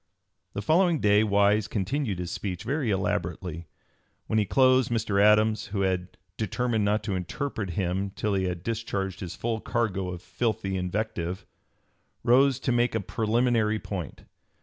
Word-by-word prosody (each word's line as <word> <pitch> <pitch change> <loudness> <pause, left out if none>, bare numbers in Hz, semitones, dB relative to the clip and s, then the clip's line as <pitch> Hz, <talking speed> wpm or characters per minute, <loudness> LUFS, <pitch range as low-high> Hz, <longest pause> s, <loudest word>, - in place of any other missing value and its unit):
The 100 - -4
following 170 - +3
day 105 -1 +4
Wise 100 0 +3
continued 110 +1 -1
his 90 -1 -4
speech, 90 -4 -4
very 140 -2 -1
elaborately. 85 -3 -2 0.6
When 110 - +1
he 105 - +2
closed, 130 +2 +4
Mr. 110 -4 +1
Adams, 105 +1 +4
who 100 -1 -2
had 90 -1 -1 0.2
"determined 110 +1 0
not 105 +1 +1
to 100 -4 -2
interrupt 100 +3 -3
him 95 +2 -1
till 105 +2 -2
he 95 -1 +1
had 90 -1 -3
discharged 100 -4 -3
his 90 -2 -6
full 115 -1 -2
cargo 100 -6 -1
of 90 0 -7
filthy 110 -5 -2
invective," 90 -1 -3 0.8
rose 130 +2 +4
to 125 - 0
"make 120 -1 +2
a - - +2
preliminary 110 +1 +1
point." 95 -5 -6
105 Hz, 150 wpm, -27 LUFS, 95-115 Hz, 0.8 s, day